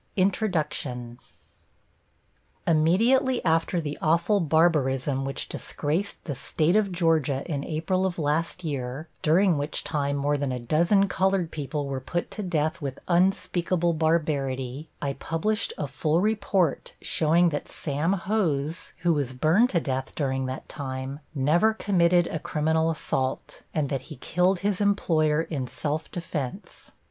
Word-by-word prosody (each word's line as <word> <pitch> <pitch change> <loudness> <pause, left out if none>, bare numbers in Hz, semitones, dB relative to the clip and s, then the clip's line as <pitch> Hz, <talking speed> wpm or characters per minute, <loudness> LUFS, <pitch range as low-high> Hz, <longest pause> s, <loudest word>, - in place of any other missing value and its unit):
] - - -41
+INTRODUCTION+ 155 - -1 1.5
Immediately 225 +12 +3
after 165 +2 +2
the 150 -2 -4
awful 170 +6 +3
barbarism 145 -5 +2
which 135 - -3
disgraced 160 +7 -2
the 145 - -4
State 155 +6 0
of 210 -2 +2
Georgia 160 -6 +1
in 145 -5 -3
April 175 +5 0
of 180 - -5
last 165 +3 -1
year, 140 0 -4
during 170 0 +3
which 145 +2 -2
time 140 -1 -1
more 145 +1 +1
than 140 -2 -1
a 125 - -2
dozen 170 - +3
colored 190 -2 +1
people 145 0 -3
were 135 -1 -3
put 175 +6 -3
to 215 - -5
death 160 -5 -1
with 135 -2 -4
unspeakable 175 -1 +2
barbarity, 150 -4 -1
I 140 -1 0
published 165 +10 -1
a 150 - -2
full 155 +3 0
report 195 -5 0
showing 170 +2 +3
that 145 -2 -4
Sam 150 +5 -1
Hose, 170 -6 -1
who 175 -1 +4
was 140 -4 -1
burned 165 - +3
to 175 - +2
death 135 -3 -3
during 130 -3 -1
that 130 +1 -6
time, 135 -1 -5 0.2
never 170 +11 +3
committed 175 -4 +3
a 160 - -3
criminal 160 +2 +1
assault, 135 -4 -2
and 150 -3 0
that 135 -3 -1
he 155 - -7
killed 180 +4 +1
his 200 0 0
employer 160 -6 +2
in 140 -6 -4
self 150 +5 -3
defense. 170 - -6
160 Hz, 145 wpm, -26 LUFS, 140-180 Hz, 1.5 s, who